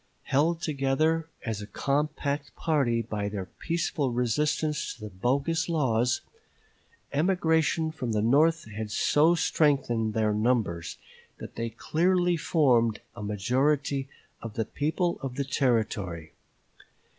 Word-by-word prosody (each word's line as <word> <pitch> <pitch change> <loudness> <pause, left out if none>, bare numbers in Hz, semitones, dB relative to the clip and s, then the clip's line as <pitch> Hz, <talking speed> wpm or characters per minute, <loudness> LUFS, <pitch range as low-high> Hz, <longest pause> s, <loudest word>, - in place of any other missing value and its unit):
Held 165 +5 +1
together 155 +3 +1 0.2
as 110 -3 -3
a 100 - -7
compact 145 +3 -2
party 135 -8 +1
by 105 -2 -3
their 100 -2 -4
peaceful 160 - -2
resistance 150 +6 0
to 120 - -20
the 105 - -6
bogus 140 - 0
laws, 125 -7 +1 0.9
emigration 160 -1 +2
from 130 -7 -4
the 105 -1 +1
North 155 +7 +3
had 110 +1 -5
so 150 +10 +3
strengthened 130 -10 +1
their 110 -1 +2
numbers 105 -7 0 0.4
that - - -9
they 115 0 -3
clearly 175 +9 +1
formed 125 -9 +2
a - - -8
majority 135 +7 0 0.3
of 115 -2 -7
the 110 - -1
people 160 - -1
of 135 -2 -5
the 140 0 -1
Territory. 105 - -1
135 Hz, 120 wpm, -27 LUFS, 110-155 Hz, 0.9 s, North